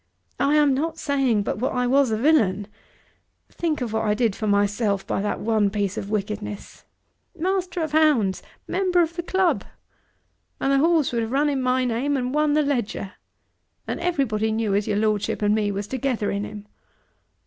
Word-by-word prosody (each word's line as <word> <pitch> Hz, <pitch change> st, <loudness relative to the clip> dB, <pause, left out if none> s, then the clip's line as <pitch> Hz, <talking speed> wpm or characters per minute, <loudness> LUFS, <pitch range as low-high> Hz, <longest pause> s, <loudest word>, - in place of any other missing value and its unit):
I 290 Hz, +2 st, +3 dB
am 295 Hz, -2 st, +4 dB
not 315 Hz, +5 st, -2 dB
saying 270 Hz, -7 st, +1 dB
but 200 Hz, -, -3 dB
what 255 Hz, +3 st, -1 dB
I 250 Hz, 0 st, 0 dB
was 270 Hz, +1 st, +3 dB
a 220 Hz, -, 0 dB
villain. 215 Hz, -8 st, +2 dB, 0.9 s
Think 320 Hz, -5 st, -2 dB
of 235 Hz, -3 st, -3 dB
what 220 Hz, -, 0 dB
I 210 Hz, -1 st, +1 dB
did 220 Hz, -3 st, +1 dB
for 215 Hz, -, -3 dB
myself 205 Hz, 0 st, +1 dB
by -, -, -1 dB
that 205 Hz, 0 st, -2 dB
one 215 Hz, -2 st, +1 dB
piece 200 Hz, -1 st, -2 dB
of 195 Hz, -, -5 dB
wickedness! 210 Hz, 0 st, -5 dB, 0.5 s
Master 365 Hz, 0 st, -1 dB
of 315 Hz, -, -3 dB
hounds! 295 Hz, -12 st, +3 dB, 0.3 s
member 365 Hz, -2 st, +2 dB
of 335 Hz, +1 st, -4 dB
the 345 Hz, -, -2 dB
club! 375 Hz, +1 st, +1 dB, 1.0 s
And 270 Hz, -, +1 dB
the 275 Hz, -, +4 dB
horse 320 Hz, -2 st, +3 dB
would 235 Hz, -, +1 dB
have 225 Hz, 0 st, -3 dB
run 290 Hz, +3 st, +2 dB
in 275 Hz, -2 st, -1 dB
my 255 Hz, 0 st, +1 dB
name 255 Hz, +4 st, 0 dB
and 250 Hz, 0 st, -2 dB
won 300 Hz, 0 st, +2 dB
the 305 Hz, -, +3 dB
Leger! 240 Hz, -8 st, -2 dB, 0.7 s
And -, -, -3 dB
everybody 260 Hz, -11 st, 0 dB
knew 220 Hz, -2 st, 0 dB
as 200 Hz, +1 st, 0 dB
your 205 Hz, -, 0 dB
Lordship 210 Hz, -1 st, 0 dB
and 205 Hz, 0 st, +3 dB
me 210 Hz, -1 st, +1 dB
was 200 Hz, +1 st, -3 dB
together 255 Hz, -2 st, -2 dB
in 200 Hz, +1 st, -2 dB
him!" 210 Hz, -1 st, -9 dB
240 Hz, 190 wpm, -23 LUFS, 210-295 Hz, 1.0 s, am